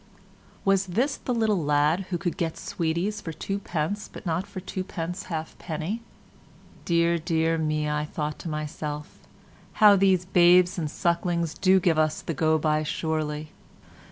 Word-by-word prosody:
Was 195 -1 +3
this 245 +11 0
the - - -5
little 220 -7 +1
lad 150 +5 +2
who 180 - -1
could 175 0 -2
get 165 -2 -2
sweeties 180 +2 -2
for 165 - -5
two 195 +5 -4
pence 195 +3 -3
but - - -10
not 175 +3 -1
for 190 - -7
two 190 0 -4
pence 180 -1 -5
halfpenny? 160 +4 -4 0.8
Dear, 170 0 +2
dear 165 0 +1
me, 155 -1 0
I 150 0 -1
thought 150 0 -4
to 170 - -5
myself, 150 -1 -5 0.5
how 210 -1 +7
these 190 -2 +3
babes 180 +1 +5
and 155 -3 -2
sucklings 170 0 0
do 190 0 +4
give 170 -3 +2
us 155 -1 +1
the 165 - -3
go 160 +1 +2
by 155 0 +1
surely. 155 -1 -2
170 Hz, 155 wpm, -26 LUFS, 155-185 Hz, 0.8 s, how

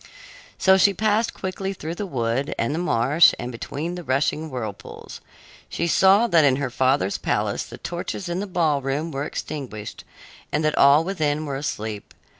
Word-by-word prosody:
So 190 0 +5
she 200 +1 +4
passed 215 +3 +1
quickly 190 +1 -4
through 165 -3 -6
the 200 +3 -5
wood 125 -2 -1
and 115 +5 -1
the 160 - -2
marsh 145 0 +4
and 120 +1 -5
between 145 +8 -5
the 180 - -6
rushing 150 +3 0
whirlpools. 110 -7 -7 0.5
She - - -2
saw 190 +6 +5
that 170 -9 +4
in 135 -2 +4
her 135 -2 -3
father's 130 -6 +1
palace - - -1
the - - -10
torches 175 +2 -5
in 175 +1 -2
the 205 - -3
ballroom 155 -3 0
were 140 0 -3
extinguished 120 -12 -6 0.5
and 150 +1 0
that 155 - +1
all 140 +3 +6
within 155 -5 -1
were 140 -2 -4
asleep. 110 -7 -5
150 Hz, 170 wpm, -23 LUFS, 130-175 Hz, 0.5 s, all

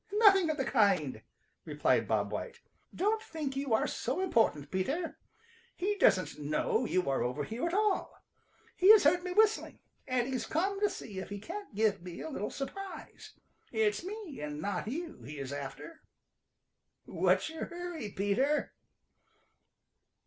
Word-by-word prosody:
"Nothing 395 -5 +6
of 310 - 0
the 270 - 0
kind," 195 - +2 0.4
replied - - +1
Bob - - 0
White. - - -5 0.3
"Don't 430 +4 0
think 305 -9 -5
you 275 -2 -2
are - - +1
so - - -2
important, 225 - +1
Peter. 280 - -2 0.6
He 405 +3 0
doesn't 185 - +3
know 155 - 0
you 185 -6 0
are 135 -1 +1
over 125 +4 -1
here 230 - -3
at 340 - -3
all. 420 -2 +1 0.6
He 370 - +4
has 435 - +6
heard 350 +5 +4
me 365 - -3
whistling, 435 +3 +2 0.3
and 255 -2 +1
he's 255 -4 -2
coming 390 +5 0
to 415 0 +3
see 205 - -7
if 190 - -6
he 205 - -5
can't 370 - -8
give 210 -2 +2
me 175 -1 -8
a 320 - -5
little 210 -6 -3
surprise. 390 +8 -7 0.4
It's 215 0 +1
me 390 - -7
and 150 0 -4
not 200 +4 -2
you 320 +7 -5
he 150 +1 -8
is 135 0 -5
after. 145 - -7 1.0
What's - - +1
your 320 - -4
hurry, 345 -8 -6
Peter?" 235 +11 +1
270 Hz, 155 wpm, -32 LUFS, -, 1.0 s, Nothing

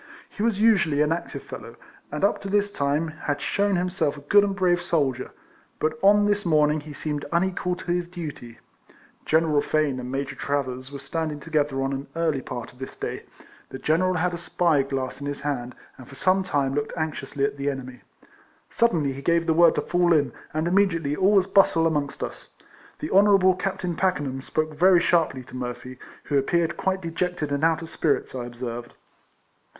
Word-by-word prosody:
He 205 - -8
was 220 -2 +1
usually 190 -10 +4
an 150 - 0
active 170 +1 -3
fellow, - - -9 0.4
and 150 +4 -4
up 200 - +2
to 195 - -5
this 205 0 +1
time 145 +2 0
had 150 -2 -3
shewn 200 +4 +1
himself 180 -4 -1
a - - -10
good 200 +8 +5
and 200 -1 -1
brave 180 -2 +2
soldier, 140 -7 0 0.5
but 155 0 0
on 205 +1 +5
this 205 0 +1
morning 155 -2 +3
he 150 +1 -10
seemed 145 0 -4
unequal 180 +1 0
to 180 -1 -5
his 175 0 0
duty. 150 -10 -8 0.7
General 155 -2 +3
Fane 150 -4 0
and 125 0 -6
Major 135 +1 -3
Travers 130 -2 -3
were 140 - -6
standing 150 +2 -3
together 145 -3 0
on 135 +1 -1
an 135 +1 -5
early 160 -5 0
part 120 -2 -7
of 125 - -21
this 130 - -8
day. - - -5 0.4
The - - -7
general 180 +6 +1
had 180 +1 0
a 170 - -4
spy 170 -3 +2
glass 135 0 -4
in 140 - -4
his 145 -1 -4
hand, 130 -4 -3 0.2
and 125 - -11
for 135 - -12
some 185 +7 +2
time 145 -7 0
looked 145 +3 -3
anxiously 155 -3 -2
at 140 - -3
the 140 +1 -1
enemy. 130 -2 -6 0.7
Suddenly 165 -12 +2
he 135 - -8
gave 170 +3 +2
the 160 - +2
word 170 0 +5
to - - +1
fall 175 -1 +2
in, 145 -3 +2 0.2
and 155 +2 -1
immediately 170 -6 +2
all 190 +6 +3
was 195 -2 +5
bustle 195 -4 +4
amongst 150 -3 -1
us. - - -8 0.4
The - - -5
Honourable 195 -1 +5
Captain 185 -2 -3
Packenham 145 -8 -1
spoke 155 +3 -2
very 180 +3 +5
sharply 165 -7 +1
to 125 - -13
Murphy, 125 0 -6 0.2
who 140 -2 +1
appeared 170 +4 0
quite 190 -1 -1
dejected 165 -2 -2
and 140 +1 -1
out 165 0 +2
of 165 - -8
spirits, 155 -3 0
I 125 -2 -4
observed. 120 0 -6
155 Hz, 195 wpm, -25 LUFS, 140-180 Hz, 0.7 s, good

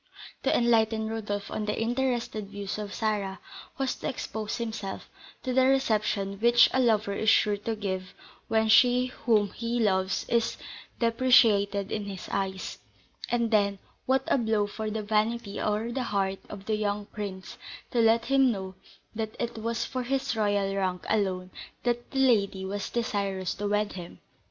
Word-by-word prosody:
To - - +2
enlighten 225 -2 +2
Rodolph 205 -2 -4
on 215 - -2
the 210 - -2
interested 240 -3 -1
views 200 0 -5
of 205 -1 -5
Sarah 205 -4 -2 0.4
was 270 -1 0
to - - -3
expose 220 -4 -4
himself 220 -4 -5 0.4
to 255 - -1
the 260 0 +4
reception 215 -6 +1
which 235 +2 +6
a 260 - +2
lover 220 -4 +2
is 220 +2 +1
sure 210 -2 +4
to 220 +2 -3
give 190 -3 -4 0.3
when 220 -1 +2
she 245 +3 +6 0.2
whom 210 -3 +4
he 235 +1 -2
loves 190 -3 +1
is 235 -1 +1 0.4
depreciated 220 -4 +4
in 210 -2 -2
his 195 -2 -7
eyes; 190 -1 -3 0.5
and 235 -1 +1
then, 200 -2 +3 0.3
what 265 +1 +3
a - - +2
blow 220 -3 +1
for 215 +1 -4
the 215 0 -3
vanity 215 0 0
or 215 +2 -1
the 260 - -2
heart 195 -1 0
of 200 -1 -9
the 215 -1 0
young 205 -1 -1
prince, 200 -3 -7 0.3
to 245 - +1
let 230 0 +4
him 270 -1 +4
know 190 -3 -5 0.4
that 220 -1 -4
it 235 -1 -3
was 230 +1 -2
for 255 - -3
his 260 -1 -1
royal 205 -2 +1
rank 185 -2 -1
alone 190 -4 0 0.3
that 240 0 -1
the - - -6
lady 205 -7 +3
was 200 +1 -3
desirous 200 -5 -1
to 205 - -3
wed 210 0 0
him! 175 -2 -8
215 Hz, 165 wpm, -28 LUFS, 200-235 Hz, 0.5 s, which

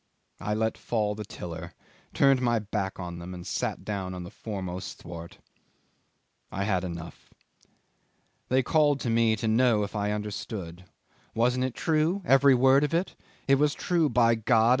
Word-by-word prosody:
I 105 +2 -2
let 110 +1 -1
fall 105 -3 -1
the 105 +1 -6
tiller, 85 -3 -8 0.4
turned 135 -2 +4
my 120 -2 +2
back 100 -3 -3
on 85 -1 -6
them, 90 +2 -7
and 90 -1 -9
sat - - -3
down 95 -3 -3
on 90 - -6
the 85 - -9
foremost 95 -4 -6
thwart. 85 -1 -9 1.1
I 100 - -2
had 95 -3 0
enough. 85 -2 -7 1.2
They 130 +1 +3
called 145 -1 +3
to 120 - -1
me 115 -1 +3
to 110 +1 -3
know 110 -1 +3
if 100 - -6
I 105 0 0
understood 100 -4 -5 0.5
wasn't 125 +3 +2
it 130 - -4
true, 165 +5 +1
every 135 0 +6
word 135 +3 +5
of 150 +2 0
it? 175 +3 -1 0.3
It 135 0 +4
was 150 0 +2
true, 170 -4 +1
by 115 -1 +4
God! 115 0 +3
110 Hz, 165 wpm, -27 LUFS, 95-130 Hz, 1.2 s, every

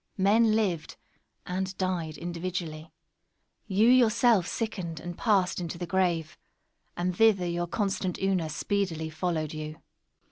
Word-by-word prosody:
Men 215 +3 +4
lived; 180 -8 -1 0.5
and 185 +1 -3
died 175 -4 -2
individually. 170 -2 -5 0.8
You 210 +3 +3
yourself 235 -5 +5
sickened, 185 -9 -3
and 175 0 -6
passed 195 -5 +1
into 170 -1 -4
the 175 - -4
grave; 170 -3 0 0.6
and 180 +1 -1
thither 210 -3 +4
your 175 0 -1
constant 190 -2 -1
Una 190 -4 0
speedily 165 -1 -2
followed 160 -1 -2
you. 155 0 -6
180 Hz, 120 wpm, -28 LUFS, 165-200 Hz, 0.8 s, yourself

